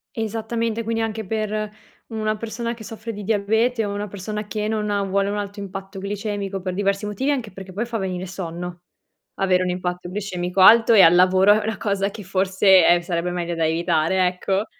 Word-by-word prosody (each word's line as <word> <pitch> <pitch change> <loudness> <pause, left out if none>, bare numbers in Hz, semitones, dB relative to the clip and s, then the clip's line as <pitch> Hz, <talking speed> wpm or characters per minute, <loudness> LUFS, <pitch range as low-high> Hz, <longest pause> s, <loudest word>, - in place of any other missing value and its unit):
Esattamente, 225 +1 -2
quindi 225 0 -2
anche 220 0 -3
per 215 +1 -2 0.4
una 215 -1 -2
persona 230 +2 -4
che 230 - -12
soffre 225 +2 -7
di 205 -1 -7
diabete 220 +3 +1
o 200 0 -3
una 205 +1 -4
persona 210 +2 -6
che 210 0 -2
non 215 -1 -1
ha 200 -1 0
vuole 195 +1 0
un 205 - -2
alto 205 0 -5
impatto 195 0 -7
glicemico 200 -1 -4
per 185 0 -4
diversi 200 +1 0
motivi, 210 +7 -1
anche 250 -8 -2
perché 190 0 -10
poi 220 +6 -3
fa 235 -1 -4
venire 185 -2 -3
sonno. 175 -1 -6 0.6
Avere 185 -1 +2
un 180 - -1
impatto 180 0 -3
glicemico 185 -2 -2
alto 230 +4 +7
e 210 - +8
al 165 -1 +7
lavoro 185 +2 +5
è - - -5
una 220 -2 -2
cosa 200 -1 -1
che 210 - -9
forse, 190 0 +4
eh, 175 0 +5
sarebbe 175 0 -2
meglio 175 -1 -3
da 165 -1 0
evitare, 170 +2 +1
ecco. 190 +3 -1
200 Hz, 200 wpm, -22 LUFS, 185-215 Hz, 0.6 s, e